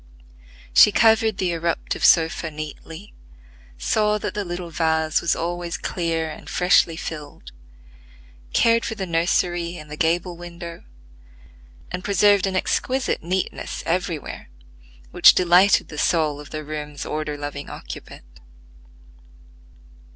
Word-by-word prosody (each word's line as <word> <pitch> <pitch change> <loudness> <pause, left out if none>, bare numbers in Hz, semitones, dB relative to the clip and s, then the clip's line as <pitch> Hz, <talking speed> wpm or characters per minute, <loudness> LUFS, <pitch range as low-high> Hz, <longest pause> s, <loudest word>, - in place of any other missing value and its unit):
She 210 - +8
covered 220 -1 +3
the 185 -2 0
irruptive 170 0 -2
sofa 160 0 +4
neatly; 155 +4 -9 0.6
saw 210 - +1
that - - -4
the 205 - -2
little 175 -1 -6
vase 160 -1 +1
was 170 - +1
always 175 0 -3
clear 165 -2 -2
and 155 - -9
freshly 180 -2 +3
filled; 150 - -8 1.0
cared 230 0 +3
for 225 - -3
the 195 -3 -4
nursery 170 0 0
in 150 0 -11
the 150 - -6
gable 170 +3 0
window; 170 0 -9 1.1
and 180 +1 -5
preserved 200 -1 +3
an 190 - -3
exquisite 255 +7 -1
neatness 185 +3 -3
everywhere, 165 - -3 0.6
which - - +7
delighted 180 +2 +4
the 150 - -7
soul 155 -4 +1
of 145 - -11
the 155 0 -6
room's 150 -1 -6
order 150 -1 -3
loving 145 0 -6
occupant. - - -10
170 Hz, 120 wpm, -22 LUFS, 155-185 Hz, 1.1 s, She